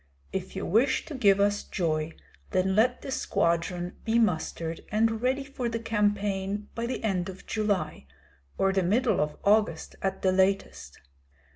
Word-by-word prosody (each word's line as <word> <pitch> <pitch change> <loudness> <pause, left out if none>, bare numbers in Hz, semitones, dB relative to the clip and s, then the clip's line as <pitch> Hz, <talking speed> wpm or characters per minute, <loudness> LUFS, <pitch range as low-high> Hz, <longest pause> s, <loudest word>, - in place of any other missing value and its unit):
If - - -4
you - - -3
wish 240 +8 +2
to 315 - -8
give 200 -7 +4
us 205 0 +2
joy, 160 -3 -1 0.4
then 190 0 +1
let 245 +4 +2
the 270 - -5
squadron 175 -4 0
be 225 +1 +1
mustered 165 -5 0
and 225 +1 +2
ready 260 +2 +1
for 265 -3 -4
the 230 - -2
campaign 205 -2 -1
by 235 0 -3
the 255 - -4
end 190 -4 0
of 190 +1 -10
July, 200 - -1 0.5
or 195 0 +2
the 190 - +2
middle 215 +4 +2
of 150 0 -2
August 205 -6 +2
at 190 0 -2
the 190 - +4
latest. 190 - 0
200 Hz, 160 wpm, -28 LUFS, 180-225 Hz, 0.5 s, give